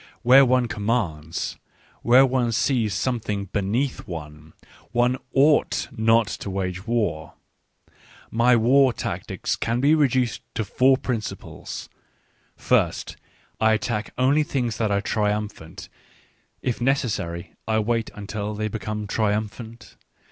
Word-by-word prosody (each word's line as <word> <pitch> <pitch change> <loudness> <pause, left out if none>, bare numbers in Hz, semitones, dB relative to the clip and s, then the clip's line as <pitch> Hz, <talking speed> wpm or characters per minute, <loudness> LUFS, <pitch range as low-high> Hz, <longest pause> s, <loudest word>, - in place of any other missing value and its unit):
Where 130 +3 +8
one 125 -1 +2
commands, 100 -9 -2 0.4
where 125 +3 +6
one 125 -2 0
sees 120 -3 +1
something 105 -5 -2
beneath 115 +7 -1
one, 75 -2 -9 0.4
oneifigtf/nottowage 115 - +1
war. 105 -9 -1 1.0
My 120 +2 +4
war 130 +3 +4
tactics - - -3
can 115 +1 -1
be 140 +4 +4
reduced 130 -6 +1
to 110 - -1
four 130 +6 +3
principles: 115 -5 -5 0.7
First, - - 0 0.4
I 110 0 +4
attack 110 -1 -2
only 135 +4 +3
things 125 -7 -2
that 110 -2 0
are 100 0 +1
triumphant— 105 -5 -3 0.8
if 125 -1 -2
necessary 110 -10 -1
I 110 -1 +1
wait 115 +1 0
until 105 +1 -5
they 110 +1 -2
become 105 0 -4
triumphant. 110 +1 -3
115 Hz, 105 wpm, -24 LUFS, 105-125 Hz, 1.0 s, Where